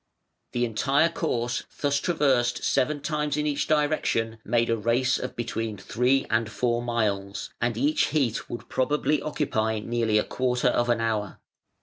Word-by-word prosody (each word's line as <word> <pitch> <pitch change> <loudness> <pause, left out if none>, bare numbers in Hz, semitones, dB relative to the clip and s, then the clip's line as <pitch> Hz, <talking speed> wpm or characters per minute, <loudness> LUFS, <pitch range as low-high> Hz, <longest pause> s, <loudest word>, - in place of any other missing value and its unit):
The 120 0 +1
entire 135 +8 +2
course 120 -8 -1 0.2
thus 145 -1 +1
traversed 135 -8 +1
seven 145 +2 +1
times 150 0 -1
in 150 - 0
each 145 -1 0
direction 145 -7 +1
made 115 +1 +1
a - - +3
race 120 +4 +1
of - - -5
between 115 -2 -3
three 125 +7 +1
and 110 0 0
four 120 0 0
miles, 105 -4 -2
and 120 -1 0
each 145 +5 +2
heat 135 -8 -1
would 120 - -7
probably 150 +2 +1
occupy 110 -8 -1
nearly 115 0 0
a 105 - +3
quarter 125 0 0
of 120 0 +1
an 120 -1 +2
hour. 110 -3 -2
120 Hz, 155 wpm, -26 LUFS, 115-145 Hz, 0.2 s, a